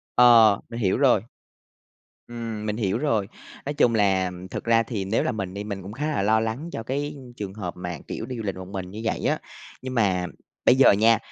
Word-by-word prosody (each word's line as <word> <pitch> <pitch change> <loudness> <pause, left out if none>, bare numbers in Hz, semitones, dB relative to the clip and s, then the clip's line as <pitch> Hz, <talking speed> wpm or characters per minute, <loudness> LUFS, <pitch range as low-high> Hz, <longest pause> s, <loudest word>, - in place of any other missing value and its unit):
Ờ, 115 -4 +7
mình 115 +1 -5
hiểu 95 +2 +1
rồi. 125 -7 +4 1.1
Ừm, 115 -3 -5
mình 105 +1 -2
hiểu 105 -2 0
rồi, 115 -8 0 0.4
nói 145 - -2
chung 120 -5 +3
là 95 -3 +2 0.2
thực - - -4
ra 115 0 +3
thì 105 -5 -4
nếu 105 +4 +1
là - - 0
mình 95 -4 -4
đi 100 +1 -5
mình 100 -2 -5
cũng 100 +3 -8
khá 150 +5 -3
là 150 -10 0
lo 110 +2 +3
lắng 115 +9 -3
cho 115 - -5
cái 145 +4 -3 0.2
trường 100 -2 -5
hợp 95 -5 -5
mà, 90 -2 -5
kiểu, - - -5
đi 125 - -6
du 110 - -5
lịch 100 -2 -2
một 95 -1 -8
mình 95 -2 -6
như 110 +3 -7
vậy 115 - -1
á. - - +1 0.4
Nhưng 130 0 -5
mà 95 -6 +2 0.4
bây - - +7
giờ 130 - +7
nha, 110 +2 +5
110 Hz, 230 wpm, -25 LUFS, 100-120 Hz, 1.1 s, Ờ